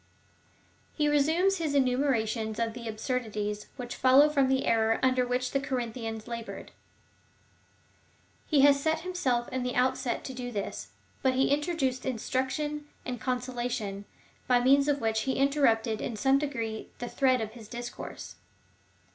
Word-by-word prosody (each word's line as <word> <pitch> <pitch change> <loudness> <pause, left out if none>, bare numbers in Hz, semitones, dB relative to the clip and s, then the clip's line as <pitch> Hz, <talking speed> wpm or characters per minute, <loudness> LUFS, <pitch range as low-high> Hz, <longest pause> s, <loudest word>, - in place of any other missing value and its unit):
He 300 -2 +1
resumes 320 +7 +3
his 310 -4 -1
enumera 255 -3 +2
tion 220 0 -3
of 230 -1 0
the 235 -1 -7
absurdities, 215 -2 -3
which 245 -2 -6
follow 270 +3 +6
from 275 -3 +3
the 265 0 +1
error 225 0 +2
under 255 -1 +3
which 250 +1 -1
the 275 - +1
Corinthians 230 -4 -4
laboured. 230 -1 -7 1.8
He 295 -4 +4
had 285 +1 +8
set 315 +3 0
himself 280 -10 -1
in 260 - -2
the 250 0 -2
outset 255 0 0
to 265 - -6
do 245 -1 -5
this, 200 -4 -4 0.3
but 260 -1 +2
he 265 +1 +3
introduced 285 -4 0
instruction 265 +4 -2 0.2
and 245 -2 -4
consola 250 -1 -2
tion, 205 -5 -4 0.4
by 250 -1 +4
means 275 +3 +4
of 285 -1 +1
which 220 -1 +1
he - - +2
interrupted 235 -6 +2
in 235 - -3
some 270 +5 +3
degree 230 -7 -4
the 245 - -5
thread 255 0 +2
of 220 -1 -4
his 225 -2 -12
discourse. 240 +1 -7
255 Hz, 155 wpm, -29 LUFS, 230-275 Hz, 1.8 s, had